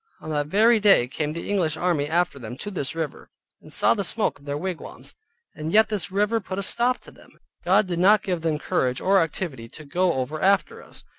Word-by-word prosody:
On 155 - -7
that 145 -1 -1
very 220 +7 +4
day 200 -12 +5
came 150 +3 -3
the 170 - -6
English 170 -6 0
army 165 -4 0
after 170 -3 0
them 120 0 -8
to 205 - -6
this 165 -6 -2
river, 160 -3 -5 0.3
and - - -14
saw - - +3
the - - -2
smoke - - +2
of 140 - -20
their 145 0 -3
wigwams, 180 +1 -6 0.4
and 155 +1 -5
yet 220 +2 +4
this 200 -4 -2
river 210 +4 +1
put 190 -2 -7
a 200 - -2
stop 245 +5 +2
to - - -14
them. - - -20 0.3
God 195 +4 +3
did 175 -2 -3
not 210 +3 +5
give 180 -4 -2
them 160 -2 0
courage 125 -3 -1
or 195 0 +3
activity 150 -8 -4
to 155 +4 -12
go 175 +4 +1
over 135 +4 -3
after 200 +1 +1
us. - - -14
175 Hz, 225 wpm, -24 LUFS, 150-200 Hz, 0.4 s, day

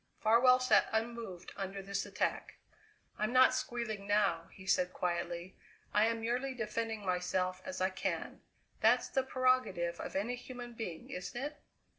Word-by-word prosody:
Farwell 245 +3 +6
sat 255 0 +4
unmoved 225 -5 -3
under 195 0 -4
this 200 +1 -2
attack. - - -2 0.6
"I'm 215 +2 +1
not 255 0 +6
squealing 230 -5 -3
now," 200 -5 +2
he 190 - -13
said 180 -1 +2
quietly; 175 0 -2 0.4
"I 210 +1 +5
am 230 0 -1
merely 250 +4 -1
defending 225 -2 -3
myself 185 0 0
as 185 - -5
I 185 +1 +2
can. 190 - -3 0.4
That's - - +4
the 265 - +2
prerogative 255 -10 +1
of - - -6
any 230 +6 -1
human 245 -1 -8
being, 180 -8 -6
isn't 185 +6 -5
it? 295 +3 -5
215 Hz, 150 wpm, -34 LUFS, 185-245 Hz, 0.6 s, Farwell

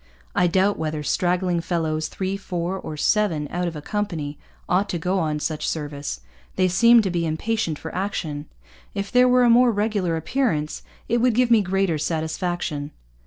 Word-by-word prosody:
'I 180 - +3
doubt 190 +3 +2
whether 155 -1 -2
straggling 180 +2 +1
fellows, 160 -2 -1
three, 190 0 -3
four, 180 -2 -3
or 155 -5 -6
seven 165 -5 +1
out 175 0 -1
of 170 - -4
a 150 - -7
company, 165 -9 -3 0.3
ought 190 +3 +1
to 175 - -1
go 180 +3 0
on 155 -3 0
such 155 0 -2
service. 145 - -4 0.3
They 185 - +3
seem 230 +5 +6
to 190 - -1
be 170 -1 0
impatient 165 +1 -1
for 160 - -8
action. 160 -6 -3 0.5
If 200 0 -3
there 250 0 +5
were 250 0 +5
a - - +5
more 245 +1 +6
regular 205 -5 0
appearance, 160 - -1 0.3
it 235 - +1
would 245 -1 +3
give 250 0 +3
me 225 -2 +6
greater 190 -3 0
sattysfaction.' 160 -1 -2
180 Hz, 175 wpm, -23 LUFS, 155-205 Hz, 0.5 s, seem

